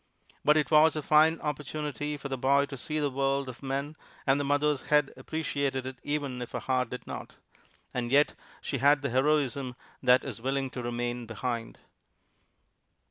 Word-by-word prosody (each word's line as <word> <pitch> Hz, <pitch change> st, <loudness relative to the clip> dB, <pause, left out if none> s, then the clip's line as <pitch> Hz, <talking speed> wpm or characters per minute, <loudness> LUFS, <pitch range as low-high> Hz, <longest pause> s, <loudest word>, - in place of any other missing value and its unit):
But 150 Hz, +1 st, +5 dB
it 150 Hz, -, +1 dB
was 155 Hz, +1 st, +6 dB
a 155 Hz, -, -2 dB
fine 155 Hz, +2 st, +5 dB
opportunity 150 Hz, 0 st, -3 dB
for 140 Hz, -, -6 dB
the 135 Hz, -, -2 dB
boy 140 Hz, +2 st, +3 dB
to 140 Hz, -, -8 dB
see 150 Hz, +4 st, -4 dB
the 145 Hz, -2 st, 0 dB
world 135 Hz, +1 st, 0 dB
of 130 Hz, -1 st, -8 dB
men, 140 Hz, +2 st, -3 dB, 0.3 s
and 135 Hz, 0 st, +3 dB
the -, -, 0 dB
mother's 145 Hz, 0 st, +1 dB
head 150 Hz, -2 st, +3 dB
appreciated 140 Hz, -4 st, -2 dB
it 130 Hz, -1 st, -7 dB
even 145 Hz, -4 st, -2 dB
if 120 Hz, -, -7 dB
her -, -, -1 dB
heart 130 Hz, -2 st, 0 dB
did 125 Hz, -, -7 dB
not. -, -, -7 dB, 0.6 s
And 120 Hz, -1 st, -2 dB
yet 145 Hz, +2 st, +4 dB, 0.3 s
she 135 Hz, -, -3 dB
had 145 Hz, +2 st, +4 dB
the 140 Hz, -, -1 dB
heroism 135 Hz, -1 st, +1 dB, 0.3 s
that 125 Hz, 0 st, +5 dB
is -, -, -6 dB
willing 135 Hz, +1 st, -1 dB
to 125 Hz, -, -5 dB
remain 120 Hz, 0 st, -3 dB
behind. 115 Hz, 0 st, -4 dB
140 Hz, 180 wpm, -29 LUFS, 130-150 Hz, 0.6 s, was